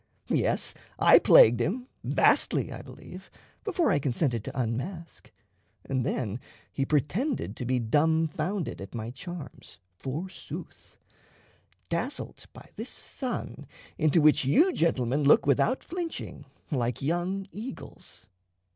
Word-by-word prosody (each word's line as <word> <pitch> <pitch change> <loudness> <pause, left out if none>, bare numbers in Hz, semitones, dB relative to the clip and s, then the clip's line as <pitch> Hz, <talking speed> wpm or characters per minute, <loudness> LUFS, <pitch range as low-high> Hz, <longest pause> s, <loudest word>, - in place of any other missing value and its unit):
Yes, - - +1 0.2
I - - +7
plagued 115 +1 +7
him 225 - -1 0.2
vastly, - - +3
I - - -7
believe, - - -12 0.3
before 360 -6 +1
I 145 - +3
consented 125 -4 0
to - - -5
unmask; 130 - -4 0.5
and 130 -2 -1
then 115 -2 -2 0.3
he 135 - -1
pretended 160 - 0
to 125 - -4
be 130 0 +2
dumbfounded 160 - 0
at 95 +4 -9
my 115 0 -4
charms, 175 +4 -9 0.2
for 150 +8 -4
sooth; 185 - -10 0.9
dazzled - - -4
by - - -13
this - - -6
sun 255 -3 -5 0.3
into 155 +1 +4
which 150 -1 +5
you 315 - +4
gentlemen 140 - +1
look 140 - +5
without 145 - +2
flinching, 345 0 -6 0.3
like 125 -3 -1
young 175 +5 -1
eagles." 230 +6 -9
150 Hz, 120 wpm, -28 LUFS, 125-190 Hz, 0.9 s, I